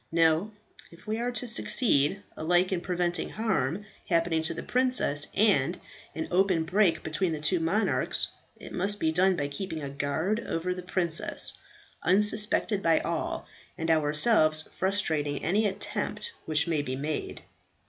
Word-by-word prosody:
No, 165 +3 +3 0.4
if 170 +4 -17
we 220 +1 -2
are 240 +1 -1
to 240 +1 +1
succeed, 200 - +3
alike 175 +3 +1
in 180 -2 -1
preventing 175 -1 -1
harm 205 - -1 0.2
happening 165 -2 +1
to 160 - -1
the - - -6
princess, 250 - +1
and 180 -6 +2 0.4
an 160 - -3
open 185 -2 +2
break 185 +1 +1
between 160 +2 -1
the 155 - -4
two 170 +4 +1
monarchs, 190 +7 +1 0.3
it - - -11
must 200 +3 0
be 160 - +1
done 185 +3 +3
by 145 -3 -2
keeping 160 +2 -5
a 140 - -5
guard 150 +9 -1
over 175 +2 -2
the 180 - -7
princess, 175 -2 0 0.5
unsuspected 210 +2 +2
by 165 -3 +3
all, - - -3 0.3
and 165 0 -1
ourselves 155 +1 +3
frustrating 160 -7 -1
any 210 +5 +2
attempt 205 - -4 0.2
which 155 +1 +2
may 160 -3 0
be 130 -3 -4
made." 150 +3 -4
175 Hz, 150 wpm, -28 LUFS, 155-200 Hz, 0.5 s, No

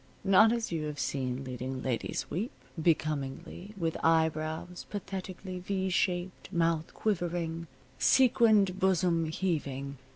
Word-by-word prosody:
Not 195 +3 +6
as 230 -3 -1
you 160 -2 -1
have 150 -1 -4
seen 130 -1 -2
leading 130 0 -5
ladies 125 -3 -2
weep, 210 +9 -2 0.3
becomingly, 155 +5 -1
with 165 -3 -1
eyebrows 160 +1 +1
pathetically 185 -2 -5
V 190 +1 -1
shaped, 180 0 -1
mouth 165 -3 +1
quivering, 170 -4 -1 0.3
sequined 220 -7 +5
bosom 180 -3 +2
heaving. 140 -5 -2
170 Hz, 110 wpm, -30 LUFS, 155-190 Hz, 0.3 s, Not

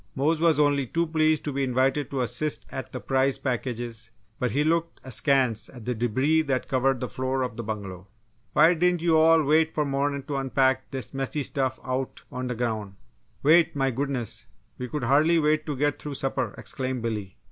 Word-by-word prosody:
Mose 155 +4 +1
was 165 -3 +4
only 145 -3 +2
too 170 +7 0
pleased 155 -1 +2
to 145 - -3
be 140 0 0
invited 130 +2 +1
to 135 -2 -2
assist 125 +6 -1
at 130 - -6
the - - -5
prize 135 0 +1
packages 120 -3 -3 0.3
but 125 - 0
he 145 +5 +1
looked 165 +1 0
askance 130 -3 +1
at 120 -4 -12
the 125 - 0
debris 130 +7 +2
that 135 -5 -1
covered 130 0 +1
the 125 - -3
floor 130 +3 -1
of 125 -2 -4
the 115 - -4
bungalow. 100 -4 -6 0.5
"Why 160 +3 +6
diden' 180 +1 +2
yo' 165 -1 +3
all 160 0 +5
wait 155 +2 +2
f' 150 - +2
mornin' 140 0 -1
to 140 +1 -3
unpack 130 0 +1
dis 130 -5 -6
mussy 135 +2 -2
stuff 135 -1 -2
out 130 0 -3
on 125 0 -4
d' 125 - -3
groun'?" 110 -5 -3 0.5
"Wait! 160 +3 +5
My 135 -1 +1
goodness, 120 -4 -3 0.3
we 125 - -3
could 150 +1 -4
hardly 150 +7 +4
wait 155 0 +1
to 150 - -2
get 145 +2 0
through 145 -2 -5
supper!" 135 0 -2
exclaimed 130 -4 -4
Billy. 105 -5 -4
135 Hz, 195 wpm, -26 LUFS, 125-150 Hz, 0.5 s, Why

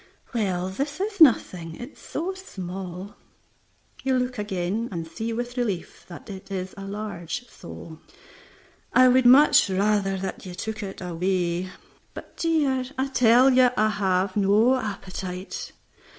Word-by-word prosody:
"Well, 190 -5 -1
this 280 - -4
is 405 -1 -3
nothing, 180 - +4
it 245 - -8
is - - -22
so 350 +5 -4
small." 190 - -7 0.8
You 265 -1 +1
look 250 -2 -2
again, 205 +3 -2
and 165 -3 -4
see 220 +8 -4
with 240 +2 -4
relief 210 -8 -3
that 175 - -11
it 195 -1 -9
is 190 -1 -4
a 195 - -8
large 205 +2 -5
sole. 165 -5 -11 0.9
"I 255 0 +7
would 255 0 +5
much 270 -3 +7
rather 195 0 +1
that 190 0 -5
you 180 -2 -8
took 220 +4 -5
it 195 -2 -7
away." 180 0 -1 0.5
"But, - - -10
dear 295 -6 +1
" - - -21
"I 265 +1 0
tell 250 +1 +5
you 255 -1 +6
I 215 0 +3
have 190 -2 0
no 210 +5 +4
appetite." 190 -4 -5
205 Hz, 150 wpm, -25 LUFS, 185-250 Hz, 0.9 s, I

